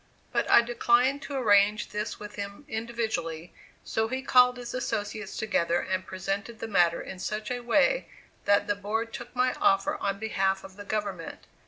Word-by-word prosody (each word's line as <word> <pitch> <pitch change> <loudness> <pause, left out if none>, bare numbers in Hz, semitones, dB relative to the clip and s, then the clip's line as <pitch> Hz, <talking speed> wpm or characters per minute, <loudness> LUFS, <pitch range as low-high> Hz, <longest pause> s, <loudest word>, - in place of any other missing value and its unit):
But - - 0
I 235 - +7
declined 240 +3 +2
to 280 - -6
arrange 210 -4 +3
this 210 +1 -4
with 210 0 -8
him 200 +6 -7
individually, 220 -8 -3 0.3
so 220 0 0
he 260 +3 -3
called 250 -2 +5
his 240 -1 -7
associates 215 -4 -3
together 170 -5 +1
and 185 0 -2
presented 195 +4 -4
the 225 - -5
matter 175 -5 +3
in 185 - -8
such 215 +4 -3
a 245 - -1
way 275 - +2 0.4
that 200 0 +4
the 205 - +1
board 220 +3 -3
took 245 +1 -8
my 255 0 +2
offer 285 +11 +3
on 200 -7 -1
behalf 195 -2 0
of 190 - -11
the 205 0 -9
government. 200 -5 -4
215 Hz, 175 wpm, -28 LUFS, 195-240 Hz, 0.4 s, I